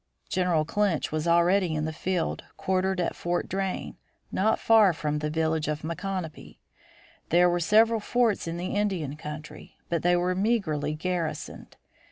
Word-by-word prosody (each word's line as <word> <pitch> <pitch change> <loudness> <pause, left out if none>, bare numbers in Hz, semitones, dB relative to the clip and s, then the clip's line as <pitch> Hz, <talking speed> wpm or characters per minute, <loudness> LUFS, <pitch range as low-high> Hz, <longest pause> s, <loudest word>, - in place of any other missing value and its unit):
General 175 -4 +1
Clinch 190 -1 0
was 155 +1 -2
already 170 0 +3
in 155 0 -1
the 160 - -3
field 180 +1 -2
quartered 190 0 0
at 175 - -1
Fort 175 0 -2
Drane, 190 0 -3 0.3
not 215 +4 +2
far 220 -5 +5
from 150 -1 -2
the 150 0 -2
village 160 0 0
of 150 0 -3
Micanopy. 170 0 -5 0.7
There 175 +2 +5
were 175 0 +1
several 220 +6 +4
forts 225 -3 +1
in 165 +1 -3
the 180 +1 -3
Indian 190 -9 -1
country, 150 0 -9
but 170 -1 0
they 175 0 +3
were 180 +1 +1
meagerly 185 -8 0
garrisoned. 170 0 -4
175 Hz, 155 wpm, -27 LUFS, 155-190 Hz, 0.7 s, far